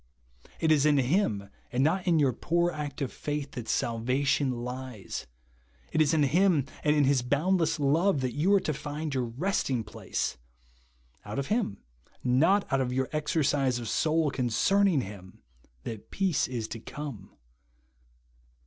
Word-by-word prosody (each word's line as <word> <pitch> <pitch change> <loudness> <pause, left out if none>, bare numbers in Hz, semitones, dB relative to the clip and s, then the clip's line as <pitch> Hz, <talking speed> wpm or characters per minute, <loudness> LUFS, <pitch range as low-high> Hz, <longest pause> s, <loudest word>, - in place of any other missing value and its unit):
It 160 -1 +2
is 150 -1 +4
in 145 -1 +4
Him, 130 - +1 0.2
and 130 +1 +1
not 185 +5 +1
in 170 -2 +4
your 140 -4 +3
2)oor 170 +7 0
act 145 -2 -4
of 130 - -4
faith, 145 -1 -4
that 120 -2 -7
salvation 130 +4 +1
lies. 125 -4 -6 0.6
It 155 - +2
is 155 - +4
in 155 -2 +3
Him 160 0 +3 0.2
and 150 0 +3
in 150 - +4
Lis 135 -1 +3
boundless 160 +7 +1
love 150 +3 +2
that 130 -2 -1
you 155 +6 +1
you - - +5
are - - +5
to 155 - -1
find 150 +1 -4
your 130 -2 0
resting 130 - -1
place. - - -3 0.9
Out - - -6
of 140 0 -2
Him, 215 - -2 0.4
not 160 +11 +3
out 135 - +3
of 125 -1 -1
your 130 +1 -1
exercise 145 -4 +1
of 120 -2 -5
soul 155 +5 +1
con 125 -2 -1
cerning 190 - +3
him, 95 -6 -11 0.4
that 110 -2 -7
peace 190 -6 +1
is 120 -4 -4
to 115 - -6
come. 125 -6 -8
140 Hz, 165 wpm, -28 LUFS, 125-160 Hz, 0.9 s, you